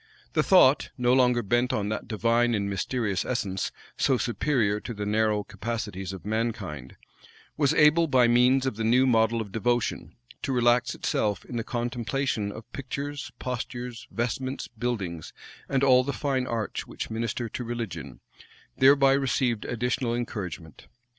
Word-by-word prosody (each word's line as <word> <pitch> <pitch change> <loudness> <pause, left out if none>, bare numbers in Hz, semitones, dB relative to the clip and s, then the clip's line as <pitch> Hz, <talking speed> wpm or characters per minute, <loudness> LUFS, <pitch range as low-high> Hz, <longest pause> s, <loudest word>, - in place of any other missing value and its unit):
The - - +3
thought, - - +5
no 125 0 +3
longer 125 -2 +3
bent 120 +5 +1
on 105 -5 -1
that 110 - -4
divine 115 +2 +2
and 100 -1 -1
mysterious 100 0 -1
essence, 100 -7 -2 0.3
so 130 - +2
superior 120 -4 0
to 120 +1 -7
the 105 0 -4
narrow 105 0 +1
capacities 105 -5 -5
of 95 -2 -9
mankind, 105 - -3 0.6
was 145 -3 +2
able, 155 +2 +5
by 130 -4 +4
means 125 +3 +4
of 130 -5 -2
the 115 - -2
new 125 +4 +4
model 115 -2 +3
of 105 -3 -7
devotion, 120 +2 -1 0.3
to 135 - -2
relax 125 0 +2
itself 105 -3 -1
in 125 - -8
the 115 - -1
contemplation 120 -2 -2
of 110 - -9
pictures, 140 +2 -5
postures, 125 -1 -5
vestments, 130 +3 -3
buildings; 105 -9 -4 0.4
and 135 -1 +1
all 130 -2 +6
the 140 +2 -3
fine 135 -3 -1
arts 115 -3 -3
which - - -6
minister 115 +1 -2
to 125 - -5
religion, 100 - -6 0.6
thereby 135 0 +6
received 130 -4 0
additional 120 0 -1
encouragement. 90 -10 -6
120 Hz, 150 wpm, -27 LUFS, 105-130 Hz, 0.6 s, all